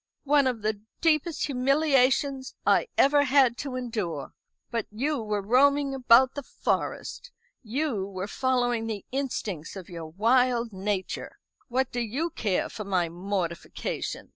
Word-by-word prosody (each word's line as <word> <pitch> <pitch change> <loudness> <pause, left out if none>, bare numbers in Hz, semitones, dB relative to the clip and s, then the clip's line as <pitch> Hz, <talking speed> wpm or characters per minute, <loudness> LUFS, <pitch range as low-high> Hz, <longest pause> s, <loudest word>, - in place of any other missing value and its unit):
"One 285 -1 +4
of 235 -4 -2
the 215 -1 -1 0.2
deepest 320 0 +1
humiliations 270 0 +2
I - - +4
ever 285 +1 +5
had 265 -3 +4
to 275 -3 -4
endure. 210 - -4 0.4
But 230 -2 -2
you 270 +5 -1
were 210 -2 -2
roaming 280 +5 +3
about 255 0 +5
the 285 - -4
Forest. - - -3 0.3
You 235 -4 -2
were 190 -1 -5
following 245 -1 0
the 210 -3 -4
instincts 220 - -3
of 190 -3 -9
your 165 -2 -7
wild 235 +5 +2
nature. 190 0 -3 0.3
What 260 +1 0
do 245 - -2
you 265 +9 -2
care 205 - 0
for 215 - -7
my 185 -4 0
mortification? 175 -1 -4
245 Hz, 140 wpm, -27 LUFS, 205-275 Hz, 0.4 s, ever